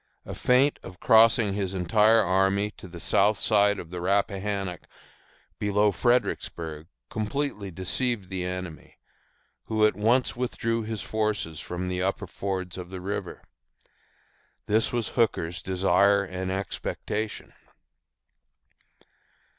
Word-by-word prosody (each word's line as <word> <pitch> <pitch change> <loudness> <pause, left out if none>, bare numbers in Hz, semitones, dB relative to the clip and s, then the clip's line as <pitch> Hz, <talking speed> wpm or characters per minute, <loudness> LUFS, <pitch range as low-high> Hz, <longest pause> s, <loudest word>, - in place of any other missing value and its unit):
A - - -6
feint 130 +3 +3
of 90 - -11
crossing 110 -2 +5
his 95 -1 -2
entire 110 +5 +4
army 95 +3 +2
to 95 - -12
the 85 -1 -10
south 100 +5 +3
side 105 -1 +3
of 85 -3 -8
the 90 -1 -5
Rappahannock 100 0 -1 0.7
below 105 0 +2
Fredericksburg 85 -9 -1 0.2
completely 110 -1 -3
deceived 95 +4 -1
the 95 -1 -3
enemy, 90 -3 -6 0.7
who 110 -1 +2
at 105 - +2
once 115 +5 +2
withdrew 115 -2 -1
his 110 -2 -4
forces 105 -8 -2
from 90 +3 -5
the 90 0 -2
upper 95 +2 -1
fords 95 -1 -4
of 90 -1 -8
the 95 0 -7
river. 95 +3 -5 1.2
This 110 +2 +2
was 120 -3 -1
Hooker's 90 -6 0
desire 100 +2 +3
and 95 0 -4
expectation. 100 +2 -4
100 Hz, 120 wpm, -26 LUFS, 90-110 Hz, 1.2 s, crossing